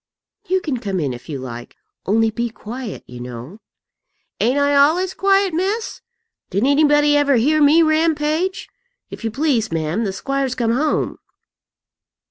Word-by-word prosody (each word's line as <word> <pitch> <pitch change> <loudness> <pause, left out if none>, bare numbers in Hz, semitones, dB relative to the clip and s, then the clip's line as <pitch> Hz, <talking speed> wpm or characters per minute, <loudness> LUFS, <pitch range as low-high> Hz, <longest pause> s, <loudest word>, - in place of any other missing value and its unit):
"You 375 +1 +1
can 285 -7 -2
come 195 -5 -3
in 140 -5 -1
if 120 +4 -11
you 145 - -4
like; 120 -2 -8 0.3
only 225 +3 +2
be 235 +2 -2
quiet, 225 +1 -8
you 125 0 -11
know." 125 - -9 0.8
"Ain't 250 +5 +2
I 285 0 +2
ollays 325 +7 +3
quiet, 390 -2 +2
miss? 395 +7 -2 0.5
Did 200 +6 0
anybody 295 +1 +4
ever 285 -1 +3
hear 300 +7 +2
me 305 +3 +6
rampage? 315 +3 0 0.4
If - - -9
you 225 - -1
please, 240 - 0
ma'am, 165 +6 -1
the 200 - -1
squire's 275 +5 -2
come 230 -2 0
home." 300 +4 -1
275 Hz, 150 wpm, -19 LUFS, 210-310 Hz, 0.8 s, me